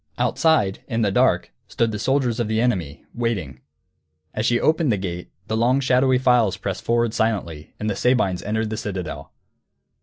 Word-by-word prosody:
Outside, 155 Hz, -13 st, +1 dB
in 115 Hz, -3 st, -1 dB
the 100 Hz, -, +1 dB
dark, -, -, +2 dB, 0.2 s
stood 115 Hz, -1 st, 0 dB
the 105 Hz, -, -4 dB
soldiers 130 Hz, -1 st, 0 dB
of 120 Hz, -, 0 dB
the 110 Hz, 0 st, 0 dB
enemy, 90 Hz, -, -1 dB
waiting. 95 Hz, -, -3 dB, 0.7 s
As 110 Hz, +1 st, -1 dB
she 120 Hz, 0 st, +2 dB
opened 155 Hz, -3 st, +2 dB
the 105 Hz, -, +1 dB
gate, 90 Hz, -2 st, -5 dB, 0.2 s
the 110 Hz, -, -2 dB
long 120 Hz, +4 st, +2 dB
shadowy 130 Hz, -1 st, +3 dB
files 125 Hz, -5 st, +3 dB
pressed 95 Hz, -2 st, -4 dB
forward 115 Hz, -1 st, +1 dB
silently, 85 Hz, -9 st, -2 dB
and 105 Hz, -, -3 dB
the 105 Hz, -, -1 dB
Sabines 100 Hz, -7 st, +1 dB
entered 110 Hz, +1 st, -2 dB
the 110 Hz, -, -3 dB
citadel. 95 Hz, -4 st, -5 dB
110 Hz, 175 wpm, -22 LUFS, 95-125 Hz, 0.7 s, shadowy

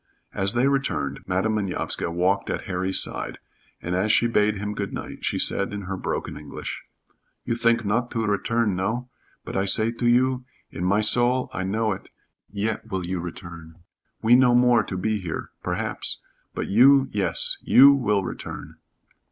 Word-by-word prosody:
As 95 Hz, +1 st, 0 dB
they 120 Hz, +3 st, +2 dB
returned 75 Hz, -, -1 dB
Madam 95 Hz, +4 st, 0 dB
Manovska 100 Hz, -5 st, -2 dB
walked 90 Hz, +3 st, 0 dB
at -, -, -3 dB
Harry's 95 Hz, 0 st, +1 dB
side, -, -, -1 dB, 0.5 s
and 85 Hz, -, -3 dB
as 100 Hz, +4 st, +2 dB
she 115 Hz, -, +4 dB
bade 105 Hz, -2 st, +2 dB
him 105 Hz, +1 st, -4 dB
good 100 Hz, -1 st, -4 dB
night -, -, -7 dB
she -, -, 0 dB
said 100 Hz, -, +2 dB
in 100 Hz, -1 st, -5 dB
her 95 Hz, +1 st, -4 dB
broken -, -, -4 dB
English: -, -, -7 dB, 0.6 s
"You 120 Hz, -, 0 dB
think 115 Hz, -1 st, +2 dB
not 120 Hz, +4 st, 0 dB
to 115 Hz, -1 st, -2 dB
return 105 Hz, 0 st, 0 dB
no? 115 Hz, +7 st, -3 dB, 0.3 s
But -, -, -7 dB
I 95 Hz, -, +1 dB
say 110 Hz, +3 st, +2 dB
to 120 Hz, +1 st, -2 dB
you 125 Hz, +1 st, +2 dB, 0.3 s
in 90 Hz, -, -5 dB
my 100 Hz, +3 st, +2 dB
soul 120 Hz, +3 st, +1 dB
I -, -, -3 dB
know 110 Hz, +4 st, 0 dB
it 95 Hz, -, -6 dB, 0.4 s
yet 105 Hz, +2 st, -3 dB
will 95 Hz, -2 st, -3 dB
you 90 Hz, 0 st, -3 dB
return 85 Hz, -1 st, -9 dB, 0.5 s
we 115 Hz, +2 st, +6 dB
no 125 Hz, -1 st, +5 dB
more 125 Hz, -1 st, +5 dB
to 95 Hz, -, -5 dB
be 110 Hz, +3 st, -1 dB
here 85 Hz, -4 st, -5 dB
perhaps -, -, -3 dB, 0.4 s
but -, -, -2 dB
you 135 Hz, +6 st, +5 dB
yes. 95 Hz, -5 st, +1 dB
You 140 Hz, +2 st, +7 dB
will 105 Hz, -7 st, +1 dB
return." -, -, -7 dB
105 Hz, 175 wpm, -24 LUFS, 95-120 Hz, 0.6 s, You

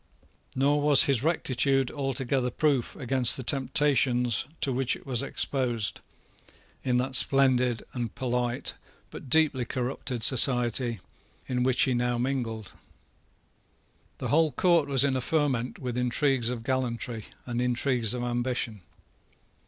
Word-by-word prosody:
Nor 145 Hz, +2 st, +2 dB
was 145 Hz, -2 st, +7 dB
his 135 Hz, -5 st, +1 dB
rectitude 135 Hz, -4 st, 0 dB
altogether 135 Hz, -2 st, -1 dB
proof 140 Hz, -2 st, -1 dB
against 130 Hz, -3 st, +1 dB
the 130 Hz, -, -6 dB
temptations 130 Hz, -3 st, +1 dB, 0.2 s
to 135 Hz, -, 0 dB
which 130 Hz, 0 st, +1 dB
it -, -, -15 dB
was 125 Hz, -4 st, +3 dB
exposed 125 Hz, -5 st, -2 dB, 0.8 s
in 125 Hz, -1 st, +1 dB
that 130 Hz, +1 st, -1 dB
splendid 125 Hz, -3 st, +3 dB
and 120 Hz, -3 st, -5 dB
polite, 125 Hz, -1 st, -2 dB, 0.4 s
but 130 Hz, -, -10 dB
deeply 150 Hz, -3 st, +3 dB
corrupted 125 Hz, 0 st, -4 dB
society, 120 Hz, -3 st, +2 dB, 0.5 s
with 125 Hz, -1 st, -2 dB
which 125 Hz, +1 st, +2 dB
he 130 Hz, -, +1 dB
now 120 Hz, 0 st, -1 dB
mingled. 120 Hz, -5 st, -3 dB, 1.5 s
The -, -, -5 dB
whole 160 Hz, +1 st, +3 dB
court 170 Hz, -1 st, +2 dB
was 135 Hz, -1 st, +6 dB
in 140 Hz, -2 st, +1 dB
a 130 Hz, -, -1 dB
ferment 135 Hz, -4 st, -1 dB
with 125 Hz, -2 st, -4 dB
intrigues 125 Hz, 0 st, +1 dB
of 120 Hz, -2 st, -5 dB
gallantry 120 Hz, -3 st, -3 dB, 0.2 s
and 120 Hz, -1 st, -3 dB
intrigues 125 Hz, -2 st, 0 dB
of 120 Hz, -, -4 dB
ambition. 120 Hz, -3 st, -3 dB
125 Hz, 130 wpm, -27 LUFS, 120-135 Hz, 1.5 s, was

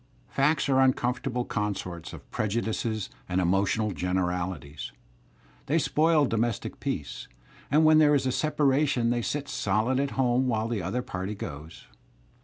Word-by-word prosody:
Facts 150 Hz, +3 st, +2 dB
are 135 Hz, -1 st, +3 dB
uncomfortable 125 Hz, -1 st, +1 dB
consorts 100 Hz, -5 st, -3 dB
of -, -, -11 dB
prejudices 110 Hz, -1 st, -2 dB, 0.2 s
and 90 Hz, +1 st, +1 dB
emotional 95 Hz, +4 st, +1 dB
I -, -, -5 dB
generalities; 90 Hz, -4 st, -2 dB, 0.8 s
they 155 Hz, -, +2 dB
spoil 155 Hz, -1 st, +3 dB
domestic 115 Hz, -2 st, -2 dB
peace, -, -, -4 dB, 0.4 s
and 155 Hz, +3 st, +4 dB
when 155 Hz, 0 st, +7 dB
there 150 Hz, -1 st, +5 dB
is 135 Hz, -2 st, +1 dB
a 130 Hz, -, +1 dB
t -, -, -1 dB
separation 140 Hz, -5 st, +2 dB
they 120 Hz, 0 st, 0 dB
sit 145 Hz, +4 st, -3 dB
solid 110 Hz, +6 st, 0 dB
at 140 Hz, -1 st, -2 dB
home 130 Hz, 0 st, +2 dB
while 110 Hz, -2 st, 0 dB
the 115 Hz, -4 st, -2 dB
other 110 Hz, +8 st, -2 dB
party 95 Hz, +1 st, -4 dB
goes. 75 Hz, -3 st, -8 dB
120 Hz, 150 wpm, -27 LUFS, 95-135 Hz, 0.8 s, when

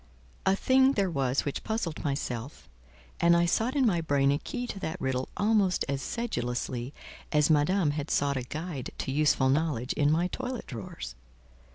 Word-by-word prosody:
A 190 Hz, -, +5 dB
thing 260 Hz, +5 st, +4 dB
there 195 Hz, -6 st, +1 dB
was 135 Hz, -3 st, 0 dB
which 145 Hz, -, -3 dB
puzzled 220 Hz, -8 st, -3 dB
myself, 135 Hz, -3 st, -4 dB, 0.5 s
and 170 Hz, 0 st, +5 dB
I 170 Hz, -, +3 dB
sought 225 Hz, -, +1 dB
in 275 Hz, -3 st, +3 dB
my 175 Hz, -7 st, +2 dB
brain 140 Hz, -3 st, +2 dB
a 145 Hz, -, +1 dB
key 245 Hz, 0 st, -4 dB
to 205 Hz, -, -6 dB
that 180 Hz, -1 st, -4 dB
riddle 130 Hz, -2 st, -1 dB
almost 205 Hz, -3 st, +2 dB
as 140 Hz, -1 st, -2 dB
sedulously 125 Hz, -, -3 dB, 0.4 s
as 150 Hz, +1 st, +3 dB
Madame 155 Hz, +2 st, +3 dB
had 145 Hz, 0 st, -4 dB
sought 140 Hz, 0 st, +1 dB
a 130 Hz, -, -1 dB
guide 155 Hz, +1 st, -5 dB
to -, -, -3 dB
useful 145 Hz, -2 st, +3 dB
knowledge 140 Hz, -3 st, 0 dB
in 145 Hz, 0 st, +2 dB
my 165 Hz, +3 st, +2 dB
toilet 255 Hz, +3 st, -4 dB
drawers. 80 Hz, -, -7 dB
155 Hz, 175 wpm, -29 LUFS, 135-195 Hz, 0.5 s, A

